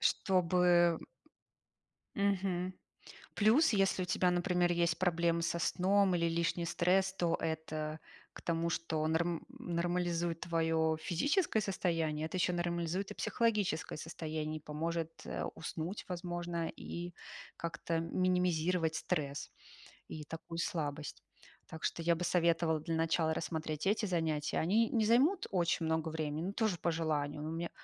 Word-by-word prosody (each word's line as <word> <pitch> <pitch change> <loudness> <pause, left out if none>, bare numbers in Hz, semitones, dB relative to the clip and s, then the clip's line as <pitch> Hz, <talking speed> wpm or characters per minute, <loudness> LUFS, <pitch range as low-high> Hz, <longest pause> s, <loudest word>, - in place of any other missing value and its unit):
Чтобы, 175 -2 +3 1.2
м, 200 - 0
м. 200 0 +5
Мгм. 185 -1 -2 0.6
Плюс, 235 +9 +5
если 195 -2 +2
у - - 0
тебя, 180 0 +2
например, 175 0 +2
есть 170 -1 +1
проблемы 170 -2 +2
со 170 - 0
сном, 190 +3 +3
или 170 -1 +2
лишний 170 +1 0
стресс, 185 +3 +2
то 175 -3 +1
это 155 -1 -3 0.3
к - - -10
тому, 170 0 0
что 160 -1 -1
норм 165 +1 0
нормализует 175 -6 -1
твое 160 -1 +1
физическое 225 - +1
состояние, 165 -6 -1
это 175 +3 -3
ещё 180 0 +2
нормализует 175 +2 -1
и - - -6
психологическое 215 -10 0
состояние, 155 -1 -4
и - - -19
поможет, 165 +2 -2 0.2
э, - - -3
уснуть, 165 +4 -5
возможно, 175 -2 -3
и 175 +1 -6 0.4
как-то 165 0 -2
минимизировать 180 -1 +1
стресс, 145 -5 -2 0.6
и 155 -1 -6
такую 165 +2 -7
слабость. 150 -3 -3 0.4
Так 160 - -9
что 170 - -1
я 170 +1 +3
бы 175 +2 -3
советовала 165 -2 +2
для 165 +1 -3
начала 160 0 +2
рассмотреть 155 0 -3
эти 215 +2 +2
занятия. 160 -5 0
Они 215 +7 +3
не 225 -3 +2
займут 290 - +4
очень 170 -3 +1
много 160 0 0
времени, 155 0 -2
но - - -3
тоже 215 -3 +1
по 170 +1 0
желанию. 150 -3 -1
Но 155 - -3
мне 165 +1 -3
170 Hz, 140 wpm, -34 LUFS, 160-180 Hz, 1.2 s, м